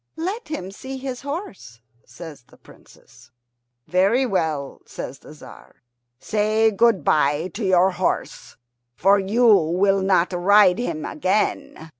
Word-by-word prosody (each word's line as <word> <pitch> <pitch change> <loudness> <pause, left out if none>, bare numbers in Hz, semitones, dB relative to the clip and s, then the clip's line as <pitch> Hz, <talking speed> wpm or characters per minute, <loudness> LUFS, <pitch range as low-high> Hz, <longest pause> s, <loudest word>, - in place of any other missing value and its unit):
"Let 385 +8 -4
him 195 - -6
see 265 +6 -8
his 260 -1 -6
horse," 275 - -8 0.3
says 155 -7 -12
the - - -21
Princess. 115 +2 -20 0.6
"Very 200 +9 +2
well," 160 - -3
says 135 - -8
the - - -16
Tzar. 140 -2 -16 0.3
"Say 215 - +1
good 225 -1 +2
bye 150 +3 +1
to 220 - -5
your 190 0 +3
horse, 180 0 -4 0.4
for 200 +6 +3
you 215 +6 0
will 195 -1 +3
not 190 -1 +1
ride 190 +2 +4
him 165 -10 -4
again. 185 -2 -2
190 Hz, 130 wpm, -21 LUFS, 165-225 Hz, 0.6 s, ride